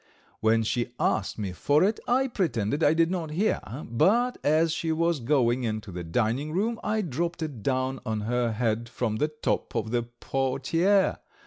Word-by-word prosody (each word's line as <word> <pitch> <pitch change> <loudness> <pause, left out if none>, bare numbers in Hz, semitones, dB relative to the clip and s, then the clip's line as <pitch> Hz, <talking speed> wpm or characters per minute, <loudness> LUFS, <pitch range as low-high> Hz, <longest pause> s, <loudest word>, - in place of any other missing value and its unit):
When 110 +1 +3
she 120 +2 -1
asked 100 - 0
me 100 -4 -3
for 145 - +2
it, 210 +3 +1
I 260 +2 +3
pretended 145 - -1
I 150 - +5
did 165 +1 +3
not 170 -4 -2
hear, 185 +8 0 0.2
but 230 - +2
as 155 +2 +3
she 165 0 -1
was 165 0 +1
going 125 -1 +2
into 110 -3 -3
the 90 0 -5
dining 120 - -1
room 225 +6 0
I 215 +1 0
dropped 170 +2 -2
it 140 -8 -5
down 130 +1 -1
on 110 -3 -2
her 120 +2 0
head 115 +1 -1
from 115 -3 -2
the 150 - +1
top 150 -4 -2
of 110 -1 -1
the 120 0 +2
portiere. 135 - 0
135 Hz, 180 wpm, -27 LUFS, 115-165 Hz, 0.2 s, I